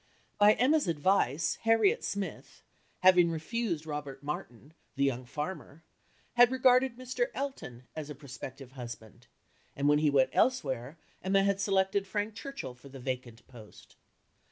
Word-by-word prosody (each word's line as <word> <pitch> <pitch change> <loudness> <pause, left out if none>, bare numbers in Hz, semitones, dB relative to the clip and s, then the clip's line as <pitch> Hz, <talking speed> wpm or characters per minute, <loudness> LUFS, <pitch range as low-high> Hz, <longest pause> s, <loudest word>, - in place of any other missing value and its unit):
By 210 +1 +7
Emma's 285 +2 +2
advice 160 -2 +1
Harriet 225 -3 +3
Smith, 200 -1 -5 0.4
having 180 -2 +6
refused 165 0 -2
Robert 145 -3 -6
Martin, 145 -1 -6 0.2
the 140 - 0
young 130 -2 0
farmer, 150 +1 -6 0.5
had 245 0 +7
regarded 255 -1 +4
Mr. 255 - -2
Elton 265 - -5
as 155 -1 -6
a 150 - -6
prospective 130 -1 -9
husband, 120 -2 -10 0.5
and 140 +1 0
when 150 0 +5
he 150 -1 +3
went 135 -2 +3
elsewhere 140 - 0 0.3
Emma 195 +1 +3
had 200 0 +1
selected 195 0 +1
Frank 205 +2 -2
Churchill 220 - -7
for 125 +3 -15
the 135 0 -10
vacant 125 -3 -5
post. 115 -5 -15
155 Hz, 140 wpm, -30 LUFS, 135-205 Hz, 0.5 s, By